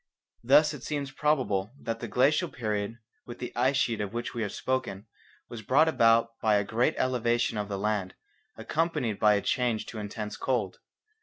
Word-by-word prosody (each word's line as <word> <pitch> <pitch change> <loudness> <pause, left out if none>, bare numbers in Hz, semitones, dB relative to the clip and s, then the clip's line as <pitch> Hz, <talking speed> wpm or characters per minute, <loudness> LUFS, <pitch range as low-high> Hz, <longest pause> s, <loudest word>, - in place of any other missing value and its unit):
Thus 150 +5 +5
it 145 - -8
seems 140 -1 -3
probable 130 -8 0
that 115 0 -4
the 120 - -5
glacial 145 - +2
period 110 -3 -3 0.3
with 120 - -8
the 125 - -7
ice 130 +3 +2
sheet 115 -5 0
of 105 0 -4
which 120 +1 -4
we 120 - -3
have 105 -3 -2
spoken 130 -6 -3 0.4
was 120 -2 -8
brought 140 +9 +4
about 115 -5 +3
by 110 -1 +3
a 100 - +2
great 115 +4 0
elevation 120 -2 +1
of 105 -1 -3
the 100 - -3
land, 100 -2 -2 0.4
accompanied 155 - -1
by 105 -1 +5
a 100 - 0
change 120 -3 0
to 110 - -7
intense 105 0 -5
cold. - - -1
115 Hz, 180 wpm, -28 LUFS, 105-130 Hz, 0.4 s, Thus